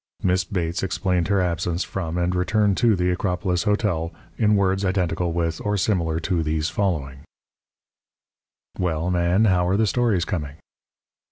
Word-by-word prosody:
Miss 90 0 +2
Bates 90 -2 -2
explained 90 -2 0
her 100 0 +2
absence 85 0 -1
from 85 -3 -4
and 90 +1 0
return 100 +3 +2
to 115 +2 +3
the 90 0 +1
Acropolis 90 -1 -1
Hotel 100 -6 0 0.2
in 105 -2 +3
words 95 0 +1
identical 90 -2 0
with 85 -1 -2
or 105 0 0
similar 85 -5 0
to 90 -1 0
these 80 0 -1
following: 75 -9 -2 1.6
"Well, 85 0 -1
Man, 90 +4 +2
how 90 -3 +3
are 95 +2 +2
the 110 - +3
stories 110 -5 +1
coming?" 75 -7 -4
90 Hz, 150 wpm, -23 LUFS, 85-100 Hz, 1.6 s, to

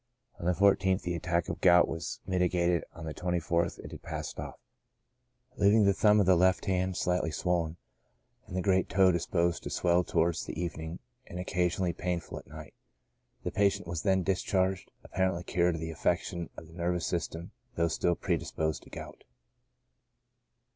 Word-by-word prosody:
On 85 - -3
the 90 - +4
14th 95 0 +3
the 90 - -2
attack 85 0 -1
of - - -5
gout 90 -1 +6
was 80 +1 -5
mitigated, 90 -2 +1
and 80 - -11
on - - -6
the 80 - -4
24th 85 -1 -1
it - - -8
had - - -9
passed - - -5
off, - - -6 1.0
leaving 105 +1 +5
the 100 - +5
thumb 105 +2 +4
of 100 - +4
the 95 0 +5
left 95 +2 +3
hand 95 -1 0
slightly 90 -2 0
swollen, 85 0 -1 0.7
and 90 - -8
the 95 - 0
great 95 -2 +2
toe 95 -1 +5
disposed 85 0 0
to - - -6
swell 90 0 +2
towards 85 -1 +1
the - - -6
evening 85 -1 -4 0.3
and 90 - -7
occasionally 90 -1 0
painful 90 0 -3
at - - -17
night. 75 0 -10 0.7
The - - -2
patient 100 -3 +1
was 85 -2 -3
then 95 -2 +2
discharged, 95 0 0
apparently 95 -2 -1
cured 90 -1 +1
of 80 - -5
the 80 0 -4
affection 85 +1 -1
of - - -8
the 80 - -16
nervous 85 0 -1
system, 85 -1 -3 0.2
though 85 0 +2
still 85 +2 +1
predisposed 80 -1 -2
to - - -16
gout. - - -9
90 Hz, 175 wpm, -30 LUFS, 85-95 Hz, 1.0 s, gout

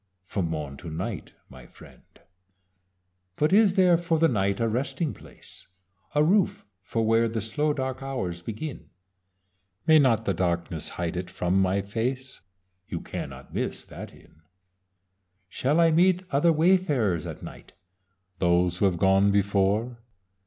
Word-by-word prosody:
From 90 -1 -2
morn 75 -3 -5
to 85 - -8
night, 80 - -5
my 65 -2 -14
friend. - - -16 1.3
"But 150 - +1
is 205 -2 +5
there 180 -3 +5
for 165 -1 0
the 165 +1 +4
night 100 -6 0
a 115 - +1
resting 135 +6 -2
place? - - -13 0.5
A 150 - +4
roof 190 +4 +2 0.2
for 115 +3 -2
where 115 +1 +3
the 115 0 -2
slow 145 +8 0
dark 130 -2 -3
hours 95 -11 -4
begin. 115 - -7 1.0
May 160 -1 +6
not 115 -6 +3
the 100 - +1
darkness 85 -2 -2
hide 85 0 -2
it 90 0 -4
from 90 +2 0
my 95 +1 +1
face? 125 +6 -4 0.5
You 85 - -4
cannot - - -8
miss - - -3
that - - -9
Inn. 80 - -21 1.1
"Shall 135 - 0
I 165 -1 +5
meet 180 +3 +3
other 145 +5 +3
wayfarers 150 - +2
at - - -8
night? - - -11 0.7
Those 90 0 +2
who - - +3
have 95 -3 +1
gone 95 +2 +4
before. 100 +4 +1
115 Hz, 145 wpm, -26 LUFS, 95-150 Hz, 1.3 s, May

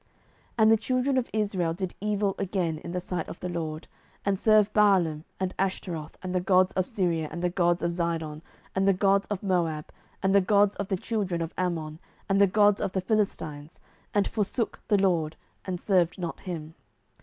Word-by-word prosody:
07:010:006 - - -36 0.5
And 220 -1 +6
the 225 - +6
children 255 +4 0
of 245 - -4
Israel 195 -6 0
did 185 0 -4
evil 205 -1 0
again 180 -5 -1
in 170 - -7
the 180 - -1
sight 180 -2 -4
of - - -8
the 180 - -4
LORD, 160 -2 -4 0.4
and 195 -1 +1
served 215 -1 +4
Baalim, 180 -7 +3
and 190 -1 -1
Ashtaroth, 175 -5 -3
and 185 0 -3
the 180 - +1
gods 185 0 +3
of 185 -1 0
Syria, 175 -8 0
and 170 +2 -5
the 180 - +1
gods 175 -1 +1
of 170 - +1
Zidon, 165 -3 -2 0.3
and 190 0 +1
the 195 - +6
gods 195 +1 +2
of 205 -2 -4
Moab, 170 -5 0 0.3
and 190 0 +3
the 200 - +6
gods 205 +1 +3
of 200 - -3
the 190 - 0
children 185 -5 -2
of 165 - -6
Ammon, 165 -4 -2 0.3
and 195 0 +3
the 200 - +7
gods 205 +1 +4
of 185 - -2
the 190 - 0
Philistines, 165 -7 -2 0.3
and 205 -1 +2
forsook 220 +1 -2
the 210 - +4
LORD, 170 -5 +1 0.3
and 180 -2 -3
served 180 -4 +2
not 175 -3 -4
him. 160 -3 -6
185 Hz, 200 wpm, -27 LUFS, 170-200 Hz, 0.5 s, the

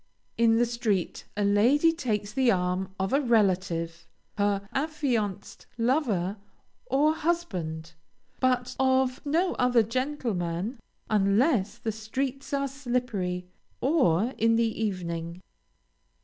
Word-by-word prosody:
In 230 -1 +4
the 240 - +4
street 230 -6 -2
a 205 - +1
lady 245 +11 +4
takes 215 -9 -2
the 260 0 +3
arm 180 0 0
of 190 +4 -1
a 280 - +4
relative, 180 - +1 0.3
her 200 -1 +1
affianced 265 -10 -2
lover, 230 - +1 0.5
or 300 - +3
husband, 180 - -2 0.5
but 250 -1 +1
of 260 0 +2
no 340 +5 +2
other 250 -2 +4
gentleman, 230 - -2 0.3
unless 210 - +2
the 235 -2 -3
streets 260 +5 -4
are 275 -1 0
slippery, 240 -9 -2 0.3
or 255 - +2
in 230 +1 +4
the 225 -1 0
evening. 170 -3 -4
230 Hz, 110 wpm, -27 LUFS, 190-265 Hz, 0.5 s, In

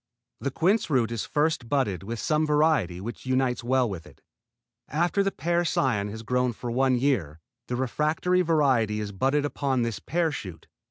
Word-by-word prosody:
The 140 - -2
quince 185 +8 +1
root 120 -6 +2
is 115 -2 -3
first 150 -5 0
budded 130 -10 0
with 115 +4 -5
some 155 0 +1
variety 150 - +2
which 115 +6 -7
unites 130 -2 +1
well 130 +1 +2
with 95 -7 -6
it. - - -18 0.7
After 175 +6 +1
this 195 0 +1
pear 175 +1 +1
cion 120 -10 0
has 110 +2 -7
grown 125 +1 0
one 125 +2 +1
year, 105 - 0 0.3
the 125 - -2
refractory 155 +8 +1
variety 135 -11 +2
is 105 -1 -4
budded 135 +9 +1
upon 135 -4 0
this 115 -2 -3
pear 165 +3 0
shoot. 95 - -7
130 Hz, 170 wpm, -26 LUFS, 115-150 Hz, 0.7 s, root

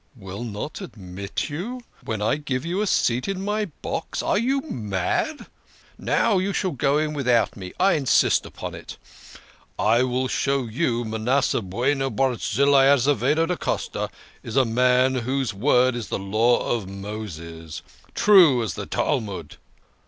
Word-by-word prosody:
Will 100 0 -7
not 115 - -6
admit 100 - -5
you! 225 +12 -5 0.2
When 110 -2 -3
I 110 - +2
give 140 -2 -3
you 180 +4 -1
a 210 - 0
seat 125 -7 +1
in 195 0 -3
my 210 +1 0 0.2
box! - - -3
Are - - +1
you 270 +4 +1
mad? 110 - -2 0.5
Now 215 -5 +1
you 195 +2 -1
shall 185 - 0
just 135 - -10
go 140 +1 +3
in 155 0 0
without 125 -5 +1
me 95 -2 -8
I 195 +2 +4
insist 140 -4 +3
upon - - -7
it. - - -9 0.8
I 115 +3 +3
will 130 0 0
show 135 +1 0
you 120 0 -1
Manasseh 110 +4 0
Bueno 130 +8 0
Barzillai 135 +1 +3
Azevedo 140 +3 +3
da 180 +2 -1
Costa - - -3 0.3
is 115 - -7
a 135 -1 +4
man 125 +2 +3
whose 130 -1 -1
word 125 +4 +3
is 115 -4 -4
the - - -2
Law 110 +5 +2
of 110 -6 -2
Moses; 85 -6 -7 0.3
true 170 - +6
as 110 - -3
the - - -6
Talmud. 100 - -2
125 Hz, 155 wpm, -24 LUFS, 110-150 Hz, 0.8 s, true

